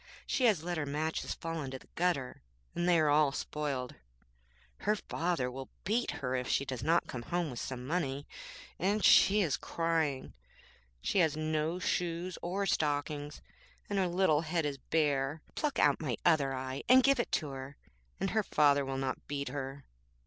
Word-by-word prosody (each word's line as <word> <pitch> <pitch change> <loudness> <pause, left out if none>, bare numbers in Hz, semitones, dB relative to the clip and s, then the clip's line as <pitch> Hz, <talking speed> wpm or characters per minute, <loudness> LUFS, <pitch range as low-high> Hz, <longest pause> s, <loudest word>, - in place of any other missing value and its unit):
She 255 - +1
has 200 -9 +3
let 175 -1 -2
her 145 - -1
matches 155 +3 -2
fall 165 -1 -4
in 135 - -4
the 130 0 -9
gutter, 170 -8 -1 0.3
and 175 +1 0
they 175 - +5
are 155 -2 +3
all 150 -1 +4
spoiled. 140 -3 -3 0.8
Her 210 +1 +1
father 165 -9 -2
will 130 +1 -7
beat 225 +5 0 0.2
her 125 - -1
if 125 0 -2
she 140 - +1
does 130 -3 -4
not 165 +6 +2
bring 125 - -6
home 165 0 -2
some 125 +1 -5
money, 145 -3 -2 0.5
and 200 +3 +1
she 205 +2 +7
is 160 -8 +1
crying. 160 -5 -1 0.7
She - - +1
has 160 -3 +3
no 155 +2 0
shoes 175 0 -2
or 190 +3 -1
stockings, 145 -3 -1 0.5
and 200 - +1
her 185 - +2
little 175 -4 +3
head 165 0 -1
is 140 -2 -3
bare. 145 0 0
Pluck 295 -2 -1
out 145 +1 +3
my 130 -8 -2
other 150 -5 +4
eye, 130 0 -4
and 255 +1 +8
give 275 -1 +4
it 240 - -1
to 155 - 0
her, 135 +1 -8 0.4
and 195 +1 -1
her 220 - +2
father 145 -7 +3
will 135 0 -3
not 135 -1 -3
beat 140 -2 -3
her. 135 0 -5
155 Hz, 180 wpm, -32 LUFS, 135-175 Hz, 0.8 s, and